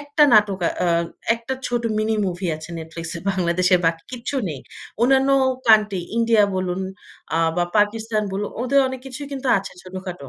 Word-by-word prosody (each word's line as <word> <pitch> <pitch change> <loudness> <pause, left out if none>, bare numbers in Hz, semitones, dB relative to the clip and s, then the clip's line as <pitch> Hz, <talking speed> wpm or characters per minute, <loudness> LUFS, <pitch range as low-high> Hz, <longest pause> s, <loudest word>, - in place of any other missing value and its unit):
একটা 290 +1 +1
নাটক 210 -3 +4 0.2
অ্যা 175 - +2 0.4
একটা 235 +3 -5
ছোট 240 -1 -1 0.2
মিনি 220 +1 +1
মুভি 180 +1 -3
আছে 160 +2 -10
Netflix 165 +1 -7
এ 170 - -7
বাংলাদেশের 180 0 +2
বাকি 165 0 0
কিচ্ছু 250 +3 -4
নেই। 145 -4 -6 0.4
অন্যান্য 265 +2 +4 0.4
কান্ট্রি 210 -4 +5 0.2
ইন্ডিয়া 230 -2 +4
বলুন 185 0 -2 0.6
আ - - +2 0.2
বা 175 - +2
পাকিস্তান 215 +1 +1
বলুন, 205 +2 -2
ওদের 275 +3 +3
অনেক 260 -1 -6
কিছুই 270 +2 -7
কিন্তু 265 -1 -3
আছে 195 - -8
ছোটখাটো। 185 -5 -8
205 Hz, 165 wpm, -22 LUFS, 180-240 Hz, 0.6 s, কান্ট্রি